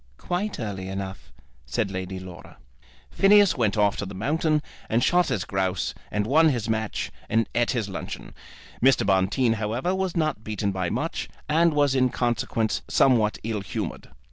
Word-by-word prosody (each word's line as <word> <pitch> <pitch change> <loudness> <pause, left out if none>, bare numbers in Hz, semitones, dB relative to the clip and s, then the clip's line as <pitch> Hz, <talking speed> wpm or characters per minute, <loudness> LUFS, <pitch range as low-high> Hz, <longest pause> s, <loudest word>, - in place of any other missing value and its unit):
"Quite 195 +4 -3
early 100 -5 -4
enough," 95 0 -6 0.4
said 100 - -1
Lady 95 0 -4
Laura. 90 -2 -11 0.5
Phineas 205 -1 +5
went 110 -5 +1
off 105 -1 +3
to - - -3
the 100 - -8
mountains, 150 - +1 0.3
and 115 +2 +2
shot 180 +4 +3
his 95 - -1
grouse, 95 -2 -1 0.2
and 105 0 -1
won 155 +7 +5
his 120 -6 -1
match, 110 -1 -2 0.2
and 115 -1 +2
eat 120 0 +1
his 115 -5 -1
luncheon. 95 - -7 0.5
Mr. 135 -4 +5
Bonteen, 100 +5 +2
however, 115 - -1
was 190 -2 -1
not 155 -9 0
beaten 105 -2 -2
by 95 -2 -2
much, - - -3 0.2
and 165 +1 +3
was 145 -2 +3
in 130 -1 +3
consequence 120 -2 -1
somewhat 115 -5 +3
ill 110 -2 -2
humoured. 95 - -5
110 Hz, 165 wpm, -25 LUFS, 100-145 Hz, 0.5 s, Phineas